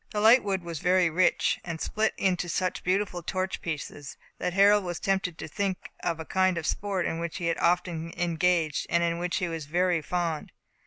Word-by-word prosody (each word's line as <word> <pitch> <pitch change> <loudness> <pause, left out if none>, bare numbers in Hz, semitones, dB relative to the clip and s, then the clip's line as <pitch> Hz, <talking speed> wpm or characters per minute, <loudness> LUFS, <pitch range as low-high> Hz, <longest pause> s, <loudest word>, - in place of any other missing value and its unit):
The 210 - -3
light 225 +5 +7
wood 195 -3 -1
was 170 -3 -5
very 180 0 +3
rich, 185 +4 +2
and 170 -2 -5
split 215 +5 0
into 180 -2 0
such 185 +2 -1
beautiful 185 -1 0
torch 185 +3 -3
pieces, 145 -3 -6 0.2
that 180 - -1
Harold 200 +2 +5
was 175 -2 -4
tempted 190 -3 -1
to - - -6
think 190 +4 -1 0.2
of 170 -2 -2
a 160 - -5
kind 185 0 +2
of 165 - -3
sport 195 -1 -1
in 165 - -2
which 170 -1 -4
he 175 - -4
had 165 0 0
often 170 -1 0
engaged, 170 -2 +1
and 170 0 +2
in 170 0 0
which 175 0 -1
he 180 - -1
was 165 -3 -5
very 175 +1 +1
fond. 165 -1 -2
175 Hz, 205 wpm, -27 LUFS, 165-185 Hz, 0.2 s, light